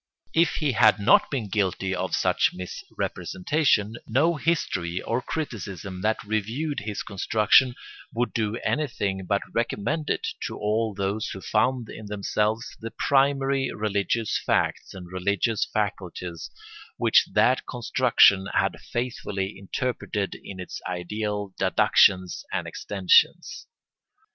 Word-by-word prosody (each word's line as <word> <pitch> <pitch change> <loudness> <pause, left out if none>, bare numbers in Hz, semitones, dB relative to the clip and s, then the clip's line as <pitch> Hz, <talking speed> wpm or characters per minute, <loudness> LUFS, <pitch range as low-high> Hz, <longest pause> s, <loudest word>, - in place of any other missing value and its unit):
If 165 -1 +3
he 150 -3 +1
had 110 -3 +5
not 100 - +5
been 125 -7 -2
guilty 95 -1 -1
of 95 0 -1
such - - +2
misrepresentation, 105 - -1
no 145 +9 +2
history 130 - -1
or 115 +5 -2
criticism 100 - -5
that 110 +2 0
reviewed 115 +8 -2
his 105 0 -4
construction 110 +5 +3 0.4
would 120 +1 -1
do 110 -1 -1
anything 100 -10 -1
but 100 +2 +1
recommend 120 +6 -1
it - - -1 0.2
to - - -7
all 110 0 0
those 100 +2 -2
who 95 - -6
found 115 +4 0
in 110 -1 -9
themselves 105 +2 -1
the 115 - -5
primary 135 +2 +1
religious 105 +1 -1
facts - - 0
and 90 -2 -8
religious 100 +4 0
faculties 90 -5 -3 0.5
which - - +4
that 130 +1 +3
construction 120 -5 +4
had - - +1
faithfully 110 -5 -3
interpreted 100 -1 -3
in 95 -2 -9
its 90 - -7
ideal 105 +2 -3
deductions 95 - +3
and - - -2
extensions. 460 0 +2
105 Hz, 120 wpm, -25 LUFS, 95-125 Hz, 0.5 s, had